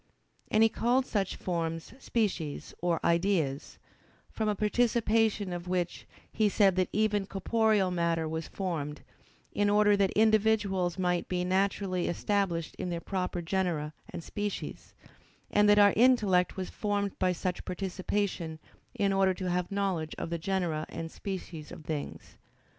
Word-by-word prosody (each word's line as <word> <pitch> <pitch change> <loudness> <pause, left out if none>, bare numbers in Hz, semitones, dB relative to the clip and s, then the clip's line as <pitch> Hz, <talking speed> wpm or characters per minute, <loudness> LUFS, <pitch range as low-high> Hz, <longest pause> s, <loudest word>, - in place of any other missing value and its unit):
And 215 - +4
he - - +7
called 245 +4 +1
such 200 -6 -1
forms 165 -1 -3
"species 190 - -2
or 170 -1 +1
ideas"; 170 -5 +1 0.5
from 220 -1 -1
a 210 - +1
participation 220 -2 +1
of 175 0 -6
which, 180 -1 -2 0.2
he 215 -2 +2
said 195 -2 +4
that 185 -1 +2
even 210 -2 +1
corporeal 210 -1 +2
matter 170 -2 0
was 160 +1 -4
formed, 155 -6 -4 0.5
in 205 0 +2
order 205 0 +5
that 200 -1 +2
individuals 210 -4 +2
might 180 -1 0
be 180 -1 -1
naturally 190 -1 0
established 175 -3 -1
in 180 - -2
their 170 -1 -2
proper 180 -1 -3
genera 165 -4 -1 0.2
and 170 - -7
species: 205 +3 -5 0.6
and 210 0 +4
that 205 - +6
our 205 -1 +7
intellect 210 -8 +4
was 185 -1 -4
formed 205 -1 -1
by 185 - +3
such 180 0 -3
participation 185 -2 -2 0.4
in 200 -1 +1
order 190 -1 +3
to 185 -1 -3
have 180 +1 -1
knowledge 190 -6 -1
of 170 - -4
the 170 - -2
genera 170 -3 -1
and 165 0 -6
species 180 -6 -6
of 155 - -10
things. 150 -3 -6
190 Hz, 145 wpm, -30 LUFS, 170-205 Hz, 0.6 s, he